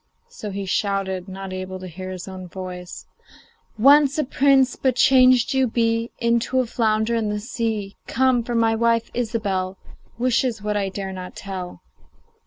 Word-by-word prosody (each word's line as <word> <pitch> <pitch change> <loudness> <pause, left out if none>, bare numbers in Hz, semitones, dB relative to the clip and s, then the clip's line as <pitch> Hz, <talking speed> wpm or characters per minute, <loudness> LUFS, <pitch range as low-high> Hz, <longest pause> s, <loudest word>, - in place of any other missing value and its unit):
So 210 - -7
he 200 0 -4
shouted, 190 -1 -1
not 190 0 -7
able 185 0 -5
to 185 - -9
hear 185 +1 -7
his 185 0 -7
own 185 -1 -8
voice: 180 0 -8 0.7
'Once 280 +4 +5
a 305 - +2
prince, 270 -1 +3
but 260 -2 0
changed 255 0 +5
you 265 -1 +3
be 230 0 0
Into 235 +2 +1
a 255 - +2
flounder 220 -1 0
in 225 -2 0
the 210 0 -2
sea. 220 -4 -3
Come! 255 -1 +2
for 235 +1 -4
my 225 -1 +3
wife, 230 0 +1
Ilsebel, 205 -6 -2 0.4
Wishes 245 -1 +1
what 210 0 -2
I 200 -1 0
dare 190 0 -5
not 185 -1 -8
tell. 185 -2 -7
220 Hz, 165 wpm, -22 LUFS, 190-240 Hz, 0.7 s, Once